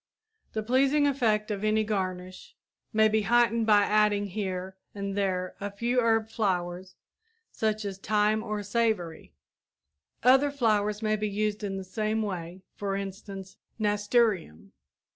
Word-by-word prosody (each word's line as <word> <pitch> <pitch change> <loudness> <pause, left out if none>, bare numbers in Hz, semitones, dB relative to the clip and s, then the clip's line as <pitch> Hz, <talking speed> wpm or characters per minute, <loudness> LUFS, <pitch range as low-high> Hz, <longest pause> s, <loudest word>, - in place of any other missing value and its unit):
The 220 - -2
pleasing 270 +5 +3
effect 225 -6 +1
of 205 0 -3
any 215 0 +2
garnish 185 -3 -4 0.4
may 220 -1 +4
be 215 0 +2
heightened 230 +1 +2
by 205 -1 +6
adding 210 -1 +2
here 190 -1 -4 0.2
and 200 -1 -4
there 185 -2 -1
a 205 - -2
few 235 +5 0
herb 225 -2 +2
flowers 185 -4 -2 0.6
such 215 -1 -1
as 195 -1 -5
thyme 210 +1 +1
or 210 -2 -4
savory. 205 -6 -1 0.9
Other 265 +4 +5
flowers 215 -5 0
may 215 0 +1
be 210 0 -2
used 210 +1 -2
in 195 -1 -3
the 190 - -5
same 215 +3 -1
way; 180 -2 -5
for 200 -1 -3
instance, 195 -1 -7 0.2
nasturtium. 205 - 0
210 Hz, 140 wpm, -28 LUFS, 195-220 Hz, 0.9 s, by